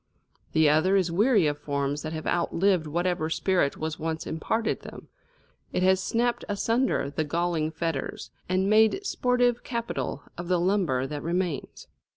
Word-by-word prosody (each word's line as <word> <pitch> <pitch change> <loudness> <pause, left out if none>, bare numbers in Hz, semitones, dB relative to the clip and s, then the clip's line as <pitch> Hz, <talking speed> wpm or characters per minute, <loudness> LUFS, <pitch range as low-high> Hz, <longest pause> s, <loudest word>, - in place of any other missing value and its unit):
The 160 -1 +5
other 155 +6 +4
is 185 -3 +2
weary 210 +1 +4
of 145 0 0
forms 145 0 -2
that 155 - -5
have 155 -1 -5
outlived 175 0 +1
whatever 170 0 -1
spirit 175 -4 +1
was 155 -1 -4
once 160 0 -3
imparted 225 +8 -1
them; - - -11 0.6
it 180 - 0
has 190 0 +4
snapped 235 +4 0
asunder 225 - 0
the 155 +2 -1
galling 165 0 0
fetters, 160 -3 -4 0.2
and 185 +1 +1
made 220 - +4
sportive 245 -5 +1
capital 185 - -3 0.2
of 175 - -5
the 180 -1 +2
lumber 175 -8 +1
that 145 +1 -5
remains. 175 -3 -3
175 Hz, 155 wpm, -27 LUFS, 155-200 Hz, 0.6 s, The